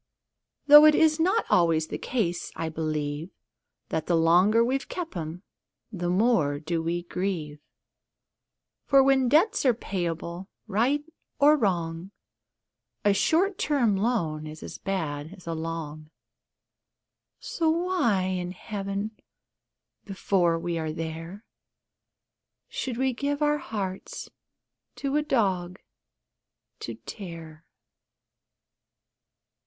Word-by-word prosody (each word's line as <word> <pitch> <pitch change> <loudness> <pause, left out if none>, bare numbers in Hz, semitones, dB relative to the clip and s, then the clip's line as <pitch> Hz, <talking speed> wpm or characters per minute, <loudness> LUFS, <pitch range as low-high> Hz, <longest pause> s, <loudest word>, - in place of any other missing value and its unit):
Though 295 +1 +10
it 305 -1 +7
is 315 0 +4
not 380 +7 +2
always 165 -3 +3
the - - -4
case, 180 -9 -2
I 165 0 -3
believe, 155 0 -3 0.6
That 160 - -2
the 175 - +2
longer 180 +8 +4
we've 265 +2 -1
kept 345 - -5
'em, 165 +2 -5 0.5
the 175 -4 -3
more 180 -7 +2
do 165 +2 -2
we 170 +1 -2
grieve: 170 -5 -3 1.3
For, 275 -1 +6
when 265 -2 +3
debts 335 - +3
are 255 -4 +4
payable, 175 -3 -4 0.2
right 240 +8 +1 0.3
or 295 +2 +6
wrong, 175 - -1 1.0
A 205 - +5
short 365 - +2
time 275 - +2
loan 175 -8 -1
is 155 0 -9
as - - -8
bad 160 -4 -3
as 185 - -17
a 165 - -3
long 160 -2 -5 1.3
So 325 -2 -1
why 330 - +1
in 180 -1 -2
Heaven 200 +2 -4 0.9
(before 185 -4 +1
we 170 0 -3
are 160 -1 -2
there) 165 +6 -6 1.2
Should 250 -3 -4
we 260 0 +1
give 285 +4 -2
our 295 0 +2
hearts 195 -6 -5 0.6
to 275 0 -2
a 300 - +3
dog 190 -10 0 1.0
to - - -6
tear? 165 -5 -9
190 Hz, 115 wpm, -26 LUFS, 165-260 Hz, 1.3 s, Though